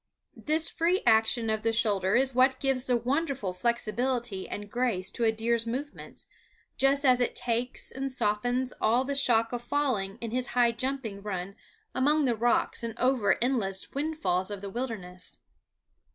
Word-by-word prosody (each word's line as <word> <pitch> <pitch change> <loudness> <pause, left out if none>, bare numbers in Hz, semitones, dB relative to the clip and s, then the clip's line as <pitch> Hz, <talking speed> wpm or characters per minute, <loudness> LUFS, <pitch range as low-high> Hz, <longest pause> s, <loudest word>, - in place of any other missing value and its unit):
This 315 +2 +3
free 350 +3 0
action 225 +1 +4
of 220 0 -1
the 225 +1 +1
shoulder 200 -4 +1
is 260 +1 +2
what 260 +1 +3
gives 270 -2 0
the 250 -1 +3
wonderful 260 - -2
flexibility 235 +1 -1
and 205 0 -6
grace 215 -5 -1
to 235 - -1
a 220 - +4
deer's 230 +1 0
movements, 275 +5 -6 0.5
just 275 +1 +3
as 250 -1 +5
it 245 - 0
takes 245 0 -1
and 270 0 -4
softens 245 +2 0
all 235 +4 +3
the 280 +1 -3
shock 235 -4 +2
of 240 - -3
falling 240 -7 -1
in 230 -2 -5
his 250 +1 -1
high 240 -1 +5
jumping 240 -4 -3
run 195 -1 -5 0.4
among 295 +3 +2
the 240 -3 +1
rocks 235 +2 +1
and 230 0 -5
over 250 -4 +2
the - - -1
endless 210 -7 -1
windfalls 280 - -1
of 205 -2 -5
the 200 -1 -6
wilderness. 190 -7 -5
240 Hz, 165 wpm, -28 LUFS, 215-265 Hz, 0.5 s, as